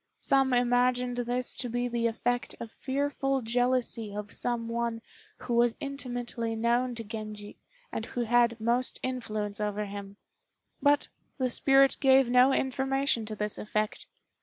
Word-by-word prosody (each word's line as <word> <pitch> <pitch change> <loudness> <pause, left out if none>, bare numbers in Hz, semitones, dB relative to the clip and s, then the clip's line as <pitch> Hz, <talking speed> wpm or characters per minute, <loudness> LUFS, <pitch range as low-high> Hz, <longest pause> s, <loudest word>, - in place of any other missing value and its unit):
Some 270 -2 +3
imagined 245 0 +2
this 245 +1 -1
to 250 -1 -3
be 245 +1 -1
the 235 -1 0
effect 245 +2 -2
of 230 -2 -7
fearful 275 0 -1
jealousy 240 -2 0
of 210 0 -5
some 235 -1 -2
one 230 0 -2 0.4
who 245 - -3
was 235 0 +3
intimately 245 -5 -4
known 240 +2 +1
to 230 - -6
Genji 215 -1 -8 0.3
and 225 - -4
who 245 - -3
had 235 0 +3
most 240 +3 0
influence 215 -5 -3
over 210 0 -1
him; 200 0 -8 0.6
but 290 0 +3 0.3
the 255 -3 0
spirit 270 +2 +5
gave 265 -3 +5
no 250 +2 +6
information 265 -3 0
to 215 - -5
this 210 0 -3
effect. 215 0 -2
240 Hz, 145 wpm, -29 LUFS, 225-255 Hz, 0.6 s, no